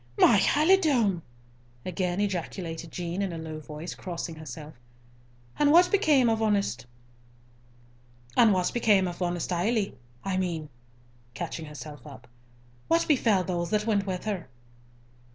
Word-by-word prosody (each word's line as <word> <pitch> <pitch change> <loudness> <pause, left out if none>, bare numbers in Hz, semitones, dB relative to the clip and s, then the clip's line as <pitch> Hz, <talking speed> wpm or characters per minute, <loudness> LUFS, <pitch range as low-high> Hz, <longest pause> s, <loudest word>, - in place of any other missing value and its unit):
"My 215 -4 +6
halidome!" 290 - +3 0.6
again 185 0 -2
ejaculated 175 -4 -3
Jean, 175 +3 -3
in 195 -2 -1
a 165 - -5
low 160 -1 -6
voice, 155 +3 -7
crossing 170 -2 -5
herself. 155 0 -9 0.9
"And 290 0 +5
what 350 +3 +6
became 305 - +4
of 225 -1 +1
honest 200 - 0 1.5
Ailie—I 185 - +1
mean," 170 -5 -2 0.7
catching 160 - -5
herself 150 -2 -10
up, 120 +3 -12 0.6
"what 335 0 +2
befell 225 -10 +3
those 175 -2 -2
that 210 0 0
went 205 -3 +1
with 185 0 -3
her?" 200 -8 -3
185 Hz, 110 wpm, -27 LUFS, 165-215 Hz, 1.5 s, My